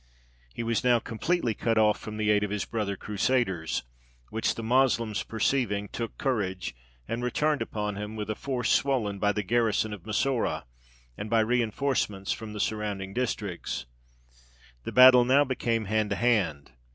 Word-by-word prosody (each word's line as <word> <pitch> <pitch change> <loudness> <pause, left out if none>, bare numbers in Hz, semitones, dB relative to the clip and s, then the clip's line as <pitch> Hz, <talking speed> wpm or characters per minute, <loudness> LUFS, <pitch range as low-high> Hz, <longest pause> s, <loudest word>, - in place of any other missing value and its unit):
He 115 - -5
was 115 -1 0
now 125 -1 +5
completely 115 +3 -1
cut 115 +1 0
off 105 -1 +4
from 110 0 -7
the 105 0 +2
aid 105 0 +3
of 105 - -1
his 105 0 -2
brother 105 -4 -3
Crusaders, 100 -6 0 0.5
which 110 +1 0
the 115 - -5
Moslems 115 -3 +2
perceiving, 110 -3 0
took 115 -2 -5
courage 95 - -2 0.3
and 120 +1 -3
returned 150 +4 +1
upon 105 -1 -3
him, 105 +1 -5
with 105 -1 -4
a 110 - -1
force 125 0 -2
swollen 115 -8 +1
by 105 +1 +2
the 105 0 -2
garrison 110 0 +1
of 100 - -8
Massoura, 120 +4 0 0.6
and 105 - -5
by 115 0 +4
reinforcements 115 -3 0
from 110 -1 -5
the 105 - -6
surrounding 100 -3 -2
districts. 105 -7 -3 1.0
The - - -3
battle 125 -1 +8
now 135 +4 +5
became 115 -4 -1
hand 110 +1 0
to 100 - 0
hand. 100 - +1
110 Hz, 165 wpm, -28 LUFS, 105-120 Hz, 1.0 s, battle